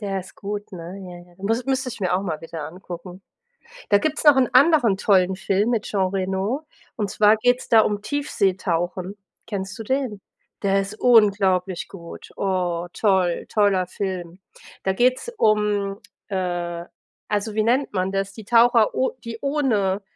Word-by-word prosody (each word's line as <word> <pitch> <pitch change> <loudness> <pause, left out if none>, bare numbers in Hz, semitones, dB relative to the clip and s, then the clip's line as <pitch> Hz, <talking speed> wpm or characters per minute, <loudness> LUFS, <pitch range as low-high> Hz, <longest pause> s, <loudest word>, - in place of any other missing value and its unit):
Der 195 -2 -2
ist 185 - -14
gut, 205 0 -6
ne? 180 +2 -8
Ja, 175 -1 -11
ja, - - -22
müs 225 +5 -1
müsste 260 -1 -1
ich 235 -2 -8
mir 180 -2 +1
auch 190 - 0
mal 165 -5 -3
wieder 160 -2 -6
angucken. 180 +1 -10 0.7
Da 205 - +6
gibt's 310 +6 -2
noch 295 -3 +7
'n 255 - +3
anderen 270 - +5
tollen 190 -2 +3
Film 200 +4 0
mit 220 -3 0
Jean 195 -3 0
Reno, 195 +9 -2 0.3
und 205 -3 -2
zwar 210 +1 +4
geht's 245 +3 +1
da 225 -1 +7
um 205 -1 -1
Tiefseetauchen. 190 - -1 0.3
Kennst 195 -3 -5
du 225 - -6
den? 255 -4 -2 0.4
Der 195 -1 +2
ist 200 +2 -4
unglaublich 195 -6 +3
gut. 170 -4 -11
Oh, 180 -3 -1
toll, 190 -5 +1
toller 200 -4 +2
Film. 180 -2 -5 0.4
Da 190 - +1
geht 250 +5 +3
's - - -7
um, 210 - +1 0.3
äh 175 -3 -3 0.4
also, 210 +1 -1
wie 215 - +2
nennt 250 +5 +1
man 185 0 -1
das, 195 0 -2
die 220 -1 -11
Taucher 230 0 +4
o 260 - +1
die 230 -1 -6
ohne, 225 -10 0
200 Hz, 165 wpm, -23 LUFS, 185-225 Hz, 0.7 s, noch